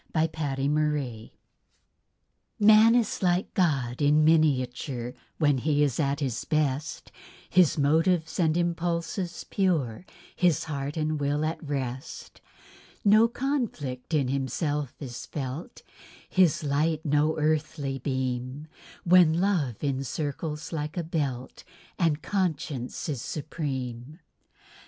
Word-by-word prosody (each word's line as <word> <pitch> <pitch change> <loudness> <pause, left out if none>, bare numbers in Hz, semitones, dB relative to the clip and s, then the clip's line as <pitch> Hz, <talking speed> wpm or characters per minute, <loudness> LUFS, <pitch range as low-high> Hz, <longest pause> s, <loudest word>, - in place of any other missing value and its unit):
A 155 - +3
SUFFERING 145 -3 -2 0.6
GOD - - -35 1.3
Man 215 +2 +7
is 235 -4 +1
like 180 0 +1
God 140 -8 0
in 150 +1 +4
miniature, 130 -5 +1 0.2
When 145 -4 +3
he 150 +2 +2
is 140 -5 0
at 140 0 0
his 130 -5 -2
best; 150 -1 -1 0.4
His 180 -5 +4
motives 160 +3 +2
and 160 -1 +2
impulses 170 +1 -2
pure, 170 - 0 0.3
His 170 -3 +2
heart 145 -1 -4
and 155 -1 -1
will 145 +2 0
at 160 +2 -3
rest; 135 -2 -5 0.6
No 215 +3 +6
conflict 230 - -3
in 140 -4 +2
himself 140 +1 -2
is 125 -4 -7
felt, 145 - -6 0.4
His 180 -5 +3
light 150 +3 0
no 150 +1 +2
earthly 150 -3 -1
beam, 130 +2 -3 0.3
While 180 0 +7
love 160 - 0
encircles 145 +3 -3
like 150 +2 -4
a 175 - 0
belt, 140 -6 -3 0.4
And 160 -3 +1
conscience 160 -9 -2
is 140 -7 -3
supreme. 135 -3 -5
150 Hz, 115 wpm, -27 LUFS, 135-170 Hz, 1.3 s, Man